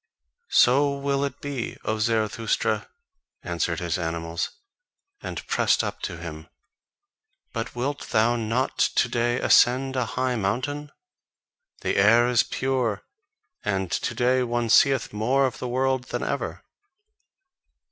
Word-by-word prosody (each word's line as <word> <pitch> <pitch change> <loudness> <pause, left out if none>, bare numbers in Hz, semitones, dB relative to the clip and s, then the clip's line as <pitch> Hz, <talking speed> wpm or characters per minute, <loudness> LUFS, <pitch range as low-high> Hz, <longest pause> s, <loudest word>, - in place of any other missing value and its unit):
"So 140 +3 +4
will 140 0 0
it 140 -1 -4
be, 140 -5 -4
O 110 0 -1
Zarathustra," 110 0 0 0.5
answered 85 -1 -1
his 90 +1 -2
animals, 85 0 -3 0.7
and - - -6
pressed - - +2
up - - -4
to - - -4
him; - - -8 1.1
"but 115 +1 -4
wilt 140 +4 -3
thou 115 +2 +3
not 115 +3 -1
to - - +3
day 120 +1 0
ascend 130 +2 +4
a 125 -3 0
high 130 -1 +1
mountain? 135 +8 -2 0.9
The - - -1
air 115 +5 +5
is 125 -2 +4
pure, 130 -6 -1 0.6
and 95 -3 -1
to 120 - -2
day 125 +2 +2
one 120 -1 -1
seeth 135 -3 +4
more 125 +6 +2
of 130 - -3
the 125 - -4
world 130 0 0
than - - -4
ever." - - -3
120 Hz, 130 wpm, -25 LUFS, 110-130 Hz, 1.1 s, air